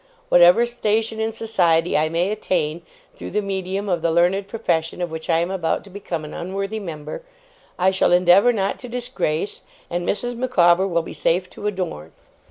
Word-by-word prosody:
Whatever 175 +6 +6
station 225 -2 -1
in 220 0 0
society 180 -7 +1
I 155 +1 +2
may 175 +4 0
attain, 170 -6 -1 0.3
through - - -8
the 210 - 0
medium 195 +1 -3
of 175 -4 0
the 165 - +1
learned 175 +4 +2
profession 180 -7 -2
of 175 -2 -3
which 160 +1 -7
I 165 - +4
am 170 +2 -1
about 175 -4 -1
to 200 - -15
become 175 -5 -5
an 150 - -9
unworthy 195 +4 -4
member, 155 -6 -7 0.6
I 185 +1 +3
shall 190 - +2
endeavour 180 +6 +5
not 200 -4 -1
to 250 - -9
disgrace, 235 - -2 0.3
and 175 0 -1
Mrs. 245 +3 -2
Micawber 190 -7 +3
will 170 -3 0
be - - -8
safe 180 +2 0
to 210 - -5
adorn. 175 - -4
185 Hz, 180 wpm, -22 LUFS, 170-210 Hz, 0.6 s, Whatever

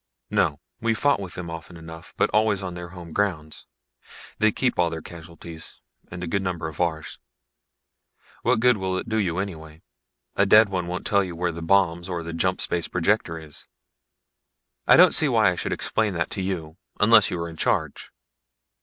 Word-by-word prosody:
"No. 70 - +1 0.2
We've 115 -1 0
fought 145 -2 +2
with 95 -3 -7
them 85 -2 -6
often 80 +1 -9
enough, 80 0 -11
but - - +2
always 105 -2 +2
on 90 -1 -4
their 85 0 -7
home 90 -2 -10
grounds. 80 -7 -2 0.7
They 110 0 +4
keep 125 0 -1
all 85 -1 +3
their 80 -1 -6
casualties, 85 -1 -11 0.3
and 85 +1 -7
a - - -4
good 100 +4 0
number 90 -3 -3
of 80 +2 -6
ours. 80 -3 -2 1.2
What 110 - +2
good 125 -2 +4
will 95 -1 -2
it - - -5
do 110 -1 -1
you 90 -5 0
anyway? 80 -5 -6 0.5
A 100 - +3
dead 105 +1 +7
one 90 -3 -2
won't 90 +1 -4
tell 100 -1 +3
you 90 -2 -6
where 90 +1 -1
the 85 0 -8
bombs 85 0 +2
or 85 -2 -3
the 85 0 -6
jump 90 +2 0
space 85 -1 -1
projector 90 -1 0
is." 75 -2 -11 1.2
"I - - +8
don't - - +7
see - - +4
why - - +4
I - - -3
should - - -3
explain 110 -4 -1
that 85 - -2
to 95 - -3
you 85 -4 -4 0.2
unless 110 0 +6
you 90 - -3
are 85 - -3
in 85 - -9
charge. - - -1
90 Hz, 195 wpm, -24 LUFS, 80-100 Hz, 1.2 s, I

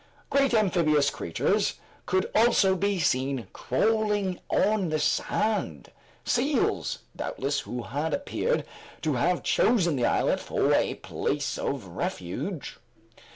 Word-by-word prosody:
Great 275 -1 +3
amphibious 165 -9 +3
creatures 85 - 0 0.3
could 185 0 0
also 215 -4 +4
be 200 +1 0
seen 130 -4 0
crawling 210 - 0
on 205 -4 +2
the 155 - 0
sand; 150 - -1 0.3
seals, - - +1 0.2
doubtless, 140 +1 -2
who 125 -3 -5
appeared 160 - -1 0.4
to - - +1
have - - +1
chosen 215 - +3
the 125 -3 +1
islet - - +1
for - - +1
a - - +2
place 145 -1 -2
of 135 -7 -2
refuge. 90 - -5
170 Hz, 110 wpm, -27 LUFS, 140-210 Hz, 0.4 s, also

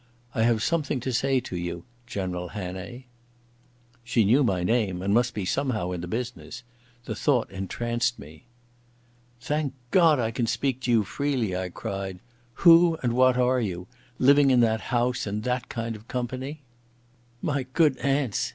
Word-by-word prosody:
I 110 - 0
have 115 -1 +2
something 150 -5 0
to 130 +1 -3
say 135 +2 +2
to 90 - -7
you, 85 -1 -4 0.2
General 90 -5 -3
Hannay." 95 +6 -7 1.0
She 120 -2 +2
knew 125 +8 +4
my 95 -7 0
name 95 -3 0
and 100 +1 +1
must 120 +1 +2
be 105 -3 -2
somehow 110 -6 -1
in 90 -2 -4
the 90 - -5
business. 125 +3 -5 0.4
The - - -3
thought 135 -6 +1
entranced 120 +5 -2
me. 75 +2 -13 0.9
"Thank 150 +1 -2 0.2
God 165 -6 +5
I 115 -2 0
can 115 0 -1
speak 130 +1 -1
to 125 - -1
you 115 -2 +4
freely," 125 -4 -1
I 90 0 -3
cried. 95 -1 -5 0.5
"Who 170 -1 +7
and 120 -2 +1
what 130 0 +4
are 125 0 +2
you—living 125 +8 +1
in 125 -2 +5
that 110 -1 +2
house 125 -2 0
in 105 +1 -2
that 125 +1 -2
kind 115 -1 -4
of 110 +2 -14
company?" 130 +4 -4 0.8
"My 140 -4 -1
good 150 -2 +3
aunts!" 135 -5 0
120 Hz, 160 wpm, -26 LUFS, 100-130 Hz, 1.0 s, Who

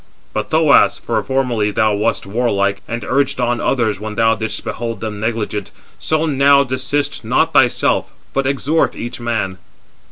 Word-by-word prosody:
But, - - -3
Thoas—for - - +3
formerly 125 -6 0
thou 110 +1 +1
wast 105 +3 0
warlike, 100 -2 0
and 115 +1 -4
urged 140 -1 0
on 120 -1 0
others 110 -6 0
when 105 0 -6
thou 115 0 +3
didst 110 0 -4
behold 115 -2 -4
them 105 -1 -5
negligent—so 110 - -3
now 140 -1 +4
desist 130 +2 -2
not - - +1
thyself, - - +2 0.2
but 135 -1 0
exhort 140 +4 +1
each 120 +1 -6
man." 115 -6 -2
115 Hz, 140 wpm, -18 LUFS, 105-135 Hz, 0.2 s, now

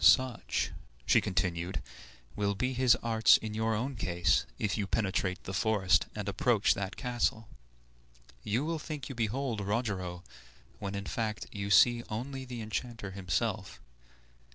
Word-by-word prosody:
"Such," 120 +6 +4 0.3
she - - +5
continued, 90 -1 -1 0.6
"will 100 -1 0
be 130 +5 -1
his 125 -1 +5
arts 115 -1 +6
in 110 -1 -6
your 110 +1 0
own 130 +5 -2
case, 85 - +1
if 105 -3 0
you 105 -3 -2
penetrate 95 -3 0
the 95 - -6
forest 95 -8 +3
and - - -4
approach - - +3
that 100 +2 -4
castle. 120 -3 -1 1.0
You 120 +8 0
will 165 0 -1
think 150 -3 -6
you - - -4
behold 115 0 -1
Rogero, 100 -4 -2 0.6
when, 100 -1 -4
in 100 0 -4
fact, 110 -5 -2
you 100 -1 -4
see 120 +5 +6
only 130 +5 -4
the 125 -2 -6
enchanter 110 -1 -4
himself. 95 - -2
105 Hz, 145 wpm, -31 LUFS, 95-120 Hz, 1.0 s, arts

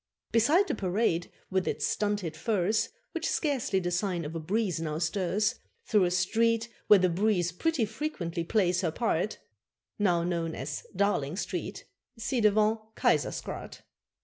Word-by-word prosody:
Beside 295 - +4
the - - 0
parade, 185 -3 0 0.2
with 190 -1 +1
its - - 0
stunted 205 -6 -1
firs, 205 +4 +1 0.2
Which 330 -1 -2
scarcely 275 - 0
the 175 -1 -2
sign 175 -2 -1
of 150 - -5
a 165 - -3
breeze 185 +1 0
now 155 -1 -2
stirs, 185 +5 +1 0.3
Through 210 -4 +3
a - - +2
street 230 +6 +1 0.2
where 210 - +9
the 185 -1 +3
breeze 180 -1 +1
pretty 280 - 0
frequently 205 - -3
plays 180 -1 +2
her 175 - +1
part, 215 0 0 0.6
Now 175 -5 +3
known 170 -2 -1
as 145 +2 -5
Darling 180 -7 +1
Street 200 - -4 0.3
ci 235 +2 -1
devant 215 +1 +4 0.2
Keizersgracht. - - -1
195 Hz, 150 wpm, -29 LUFS, 170-220 Hz, 0.6 s, where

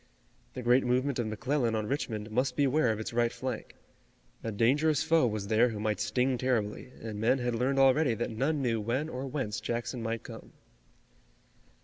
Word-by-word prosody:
The 125 - -5
great 125 +2 +4
movement 130 +2 0
of 120 - 0
McClellan 120 +2 0
on 110 -1 -1
Richmond 110 -4 -3
must 125 +3 0
beware 140 -2 +3
of 110 - -3
its 110 - -5
right 120 0 +2
flank. 130 -3 -5 0.7
A 115 - -2
dangerous 140 +8 +2
foe 160 -5 +3
was 105 -3 -3
there 110 +4 +3
who 110 -2 -5
might 105 0 -1
sting 125 +4 0
terribly, 125 -1 -1
and 110 -2 -5
men 120 +4 +3
had 120 -1 -1
learned 130 +4 0
already 135 -1 +4
that 120 +2 -3
none 135 +6 0
knew 115 -3 0
when 130 +8 -1
or 130 -1 -5
whence 130 -6 -3
Jackson 120 +1 -3
might 115 -1 -3
come. - - -11
120 Hz, 180 wpm, -30 LUFS, 110-135 Hz, 0.7 s, great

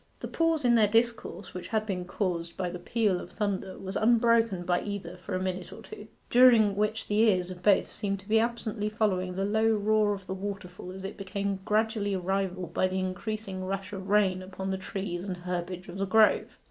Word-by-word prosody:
The - - -5
pause 330 -4 +1
in 240 - +5
their 220 -3 +5
discourse, 225 -3 0
which 180 - -6
had 215 -1 0
been 185 -4 -3
caused 175 -3 -3
by 180 -2 -2
the 180 - -6
peal 200 -1 0
of 180 - -10
thunder 195 -2 -2
was 195 +1 -6
unbroken 230 -4 +3
by 175 0 +1
either 190 -4 -5
for 185 +1 -5
a - - 0
minute 185 -1 -3
or - - -10
two, 210 - -10 0.2
during 235 -5 +6
which 210 +2 -1
the 210 +1 +1
ears 185 -5 +3
of 180 -1 -9
both 200 +1 +4
seemed 200 -1 -3
to 195 - -20
be 220 +1 +4
absently 225 -2 -1
following 185 -4 0
the 195 +1 0
low 220 +2 +2
roar 210 0 +2
of 195 -1 -11
the 190 - -4
waterfall 190 -2 -6
as 190 +1 -8
it 195 - -6
became 200 0 -3
gradually 215 -2 +1
rivalled 185 -1 -2
by 185 - +2
the 185 0 -3
increasing 190 +1 -3
rush 195 +1 -4
of 190 0 -6
rain 195 -3 +3
upon 190 +1 -5
the 190 - -1
trees 190 -2 -4
and 190 -2 -4
herbage 180 0 -4
of 180 +1 -8
the 195 - 0
grove. 220 +2 +3
195 Hz, 210 wpm, -28 LUFS, 185-215 Hz, 0.2 s, during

